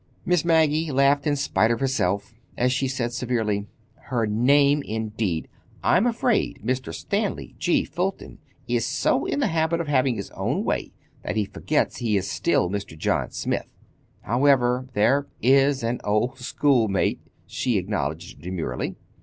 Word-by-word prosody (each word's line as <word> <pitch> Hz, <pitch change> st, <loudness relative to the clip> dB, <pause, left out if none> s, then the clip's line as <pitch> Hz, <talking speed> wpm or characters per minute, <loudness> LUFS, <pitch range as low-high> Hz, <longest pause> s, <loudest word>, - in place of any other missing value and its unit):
Miss 180 Hz, -3 st, +2 dB
Maggie 160 Hz, -1 st, +3 dB
laughed 140 Hz, +2 st, +3 dB
in 145 Hz, -, +2 dB
spite 110 Hz, -6 st, +1 dB
of 115 Hz, -1 st, 0 dB
herself, 100 Hz, -7 st, 0 dB, 0.2 s
as 125 Hz, +1 st, +2 dB
she 135 Hz, +1 st, 0 dB
said 125 Hz, -2 st, -2 dB
severely: 110 Hz, -5 st, -1 dB, 0.4 s
"Her 120 Hz, -3 st, 0 dB
name, 140 Hz, +7 st, +3 dB
indeed! 110 Hz, -, -3 dB, 0.4 s
I'm 200 Hz, +7 st, +4 dB
afraid 235 Hz, -1 st, 0 dB
Mr. 130 Hz, +2 st, -1 dB
Stanley 205 Hz, 0 st, -3 dB
G. 175 Hz, -, +2 dB
Fulton 185 Hz, +3 st, -4 dB, 0.3 s
is -, -, +1 dB
so -, -, +1 dB
in -, -, -1 dB
the -, -, +3 dB
habit 160 Hz, +1 st, +1 dB
of 170 Hz, -, -3 dB
having 130 Hz, -3 st, +2 dB
his 100 Hz, -3 st, -6 dB
own -, -, -2 dB
way -, -, -2 dB, 0.3 s
that -, -, -4 dB
he 105 Hz, -1 st, +1 dB
forgets 145 Hz, +9 st, -1 dB
he 110 Hz, -4 st, +1 dB
is 95 Hz, 0 st, -2 dB
still 90 Hz, -, +1 dB
Mr. 100 Hz, -3 st, -5 dB
John -, -, 0 dB
Smith. -, -, -3 dB, 0.5 s
However, 125 Hz, 0 st, +2 dB
there 135 Hz, +7 st, +2 dB
is 135 Hz, +1 st, +3 dB
an 115 Hz, +2 st, -1 dB
old 115 Hz, +6 st, 0 dB
schoolmate," 120 Hz, -6 st, +1 dB, 0.3 s
she 125 Hz, -5 st, -1 dB
acknowledged 85 Hz, -4 st, -3 dB
demurely. 85 Hz, -8 st, -3 dB
125 Hz, 150 wpm, -24 LUFS, 105-145 Hz, 0.5 s, I'm